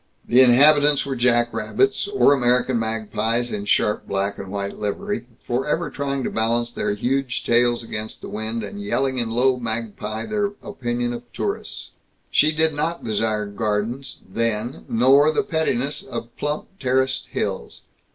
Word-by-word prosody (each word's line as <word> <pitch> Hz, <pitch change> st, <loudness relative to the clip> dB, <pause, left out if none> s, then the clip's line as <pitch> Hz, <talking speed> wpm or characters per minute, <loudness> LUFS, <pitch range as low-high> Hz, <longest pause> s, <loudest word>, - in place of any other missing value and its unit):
The 125 Hz, +2 st, +6 dB
inhabitants 145 Hz, +3 st, +6 dB
were 135 Hz, -1 st, -3 dB
jackrabbits, 120 Hz, -, +1 dB
or 400 Hz, -, +4 dB
American 125 Hz, -1 st, +2 dB
magpies 110 Hz, +1 st, -1 dB
in 100 Hz, -1 st, -3 dB
sharp 105 Hz, +1 st, +1 dB
black 100 Hz, +1 st, -1 dB
and 95 Hz, -1 st, -7 dB
white 100 Hz, -1 st, -4 dB
livery, 160 Hz, -, -3 dB, 0.2 s
forever 150 Hz, +6 st, -1 dB
trying 140 Hz, -1 st, -2 dB
to -, -, -2 dB
balance 115 Hz, +1 st, 0 dB
their 105 Hz, -, -1 dB
huge 130 Hz, +4 st, -1 dB
tails 120 Hz, 0 st, +3 dB
against 110 Hz, -1 st, -6 dB
the -, -, -7 dB
wind, 110 Hz, +1 st, -3 dB
and 100 Hz, 0 st, -6 dB
yelling 130 Hz, +5 st, 0 dB
in 115 Hz, -2 st, -1 dB
low 125 Hz, +3 st, +2 dB
magpie 110 Hz, -2 st, -4 dB
their 205 Hz, -1 st, -1 dB
opinion 120 Hz, -1 st, -2 dB
of 120 Hz, 0 st, -9 dB
tourists. -, -, -4 dB, 0.4 s
She 155 Hz, -, +4 dB
did 160 Hz, 0 st, +2 dB
not 160 Hz, +4 st, -2 dB
desire 110 Hz, -1 st, 0 dB
gardens, 105 Hz, +5 st, -2 dB
then, 115 Hz, +4 st, -2 dB
nor 135 Hz, +6 st, +5 dB
the 215 Hz, -, +1 dB
pettiness 155 Hz, -, 0 dB
of 120 Hz, -3 st, -7 dB
plump 150 Hz, +6 st, -4 dB
terraced 130 Hz, 0 st, 0 dB
hills. -, -, -3 dB
120 Hz, 150 wpm, -22 LUFS, 110-140 Hz, 0.4 s, The